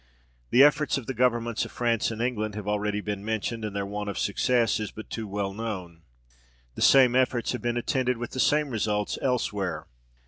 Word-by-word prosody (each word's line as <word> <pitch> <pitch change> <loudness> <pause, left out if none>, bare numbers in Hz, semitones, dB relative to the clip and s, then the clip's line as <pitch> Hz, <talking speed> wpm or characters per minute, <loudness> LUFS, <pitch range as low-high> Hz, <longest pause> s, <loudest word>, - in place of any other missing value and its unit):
The 130 - +7
efforts 150 0 +3
of 135 - -6
the 130 - -3
governments 120 -2 +1
of - - -7
France 115 -2 0
and 115 0 -3
England 110 -4 -2
have 105 -1 -6
already 105 0 -1
been 100 -1 -4
mentioned, 110 +1 -2
and 105 -2 -4
their 100 0 -1
want 105 +1 -4
of 100 - -5
success 115 +2 +1
is 105 -2 -3
but 110 - -11
too 110 -2 -4
well 100 -1 -3
known. 95 -6 -6 0.7
The - - -8
same 130 -3 +6
efforts 125 -2 +1
have 125 - -4
been 120 +1 -1
attended 125 0 0
with 120 +1 -5
the 130 - -5
same 150 +1 +2
results 105 -2 -1
elsewhere. 100 - -1
110 Hz, 200 wpm, -27 LUFS, 105-125 Hz, 0.7 s, The